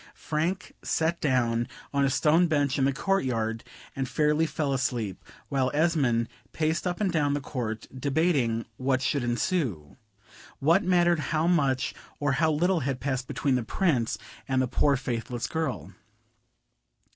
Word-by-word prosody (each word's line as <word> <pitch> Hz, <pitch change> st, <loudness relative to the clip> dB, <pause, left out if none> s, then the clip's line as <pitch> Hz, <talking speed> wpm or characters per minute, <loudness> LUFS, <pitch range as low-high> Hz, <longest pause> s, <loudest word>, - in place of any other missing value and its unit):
Frank 165 Hz, +6 st, -2 dB
sat 165 Hz, +1 st, 0 dB
down 120 Hz, -4 st, +1 dB, 0.3 s
on 140 Hz, 0 st, +2 dB
a 135 Hz, -, +3 dB
stone 155 Hz, +5 st, +3 dB
bench 145 Hz, -3 st, +1 dB
in 135 Hz, -, +3 dB
the 140 Hz, -, +3 dB
court 195 Hz, +8 st, 0 dB
yard, 115 Hz, -3 st, -1 dB, 0.3 s
and 135 Hz, -2 st, -2 dB
fairly 150 Hz, +3 st, +2 dB
fell 145 Hz, -3 st, -1 dB
asleep, 120 Hz, -7 st, -2 dB, 0.2 s
while 135 Hz, -2 st, +1 dB
Esmond 140 Hz, -8 st, +2 dB, 0.3 s
paced 160 Hz, +3 st, 0 dB
up 175 Hz, -1 st, -2 dB
and 200 Hz, -3 st, +1 dB
down 145 Hz, -4 st, +1 dB
the -, -, -1 dB
court, 120 Hz, -6 st, -4 dB
debating 135 Hz, -4 st, +1 dB
what 130 Hz, 0 st, 0 dB
should 140 Hz, 0 st, 0 dB
ensue. 120 Hz, -, -1 dB, 0.6 s
What 165 Hz, -, +3 dB
mattered 175 Hz, -2 st, +3 dB
how 155 Hz, 0 st, +1 dB
much 140 Hz, -7 st, +2 dB, 0.3 s
or 145 Hz, -1 st, +1 dB
how 155 Hz, +4 st, +2 dB
little 175 Hz, +4 st, +2 dB
had 135 Hz, -3 st, -2 dB
passed 130 Hz, -2 st, -2 dB
between 140 Hz, -3 st, 0 dB
the 125 Hz, -, +2 dB
Prince 125 Hz, -, 0 dB, 0.3 s
and 130 Hz, -1 st, +1 dB
the 130 Hz, -, +2 dB
poor 140 Hz, +3 st, +2 dB
faithless 120 Hz, -2 st, -3 dB
girl? 135 Hz, -, -3 dB
140 Hz, 155 wpm, -27 LUFS, 125-160 Hz, 0.6 s, a